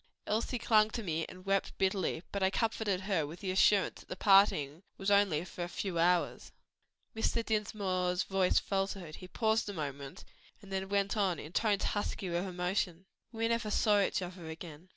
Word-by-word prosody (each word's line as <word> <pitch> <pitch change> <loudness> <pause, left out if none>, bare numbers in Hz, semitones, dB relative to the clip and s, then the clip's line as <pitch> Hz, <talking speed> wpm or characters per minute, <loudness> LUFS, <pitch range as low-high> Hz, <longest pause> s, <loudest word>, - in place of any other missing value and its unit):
Elsie 225 +4 -1
clung 215 -2 +4
to 230 +1 -4
me 165 -3 -2
and 185 +1 -12
wept 195 0 0
bitterly; 190 -3 0
but 200 - -3
I 190 - +4
comforted 210 -2 0
her 190 -6 0
with 165 +4 -9
the 190 -2 -2
assurance 195 +1 +3
that - - -17
the - - -4
parting 185 -7 +4 0.2
was 195 +1 -1
only 195 -6 +3
for 175 - -6
a 175 - -5
few 185 -2 -3
hours." 175 +1 +1 0.6
Mr. 225 +1 0
Dinsmore's 190 -4 0
voice 190 -1 +2
faltered. 195 -4 -2
He 185 - -10
paused 220 +1 0
a - - -4
moment, 145 0 -6 0.3
then 190 -2 -5
went 200 +1 +1
on 195 -5 +1
in 150 - -8
tones 210 -2 +1
husky 205 -3 -2
with 175 +2 -1
emotion. 180 0 -2 0.3
"We 225 -1 -1
never 230 -1 0
saw 210 -1 +3
each 190 - 0
other 175 -2 -8
again. 160 +1 -9
190 Hz, 180 wpm, -32 LUFS, 175-205 Hz, 0.6 s, clung